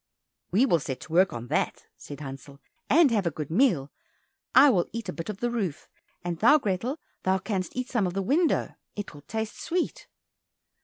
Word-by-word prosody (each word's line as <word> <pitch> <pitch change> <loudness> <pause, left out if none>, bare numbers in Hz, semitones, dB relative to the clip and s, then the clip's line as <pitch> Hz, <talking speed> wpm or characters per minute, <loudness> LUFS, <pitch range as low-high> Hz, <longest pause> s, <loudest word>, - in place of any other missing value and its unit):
"We 215 +9 +4
will 170 -10 +3
set 130 -2 -5
to 160 - -9
work 185 +3 +5
on 120 0 -6
that," - - -1
said 145 0 -10
Hansel, 140 0 -9 0.3
"and 305 -2 +6
have 205 -6 +1
a - - +3
good 155 -1 -6
meal. 170 - +2 0.6
I 275 +2 +9
will 180 -6 +2
eat 230 -1 -5
a - - -3
bit 165 +6 -6
of 205 -2 -6
the 240 0 0
roof, 195 -11 -3 0.4
and 175 -1 -3
thou, 290 +7 +7
Grethel, 235 - -2 0.5
canst 190 -4 -3
eat 255 0 -2
some 220 -7 +2
of 180 - -5
the 195 - 0
window, 310 - +2 0.2
it 205 -1 -6
will 145 - -12
taste 220 +6 -4
sweet." 350 +1 -2
195 Hz, 195 wpm, -27 LUFS, 165-240 Hz, 0.6 s, I